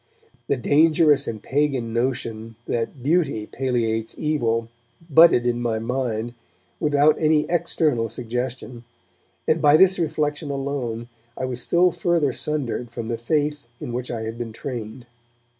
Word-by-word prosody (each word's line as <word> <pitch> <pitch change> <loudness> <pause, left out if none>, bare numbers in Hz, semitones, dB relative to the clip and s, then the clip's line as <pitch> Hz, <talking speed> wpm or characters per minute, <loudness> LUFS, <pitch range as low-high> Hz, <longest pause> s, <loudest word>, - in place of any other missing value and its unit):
The 140 - +1
dangerous 150 +2 +3
and 110 -2 -5
pagan 135 -5 0
notion 115 -2 -2
that 120 +2 -3
beauty 140 -8 +1
palliates 115 -3 -2
evil 115 -7 0 0.4
budded 160 -5 +6
in 120 0 0
my 115 -2 0
mind, 120 -1 -2 0.5
without 150 0 +3
any 155 -1 +3
external 155 -8 +1
suggestion, 125 +1 -5 0.6
and 155 0 +2
by 150 0 +6
this 190 +1 +5
reflection 150 -2 -1
alone 135 -4 -3 0.3
I 130 - -2
was 125 -1 -2
still 175 +7 +3
further 165 -6 +1
sundered 130 -5 -2
from 115 -1 -6
the 115 - -2
faith 150 +4 0 0.2
in 120 - -6
which 125 +1 -3
I 115 -2 -3
had 110 +1 -5
been 115 -2 -5
trained. 120 -1 -6
130 Hz, 140 wpm, -23 LUFS, 115-150 Hz, 0.6 s, budded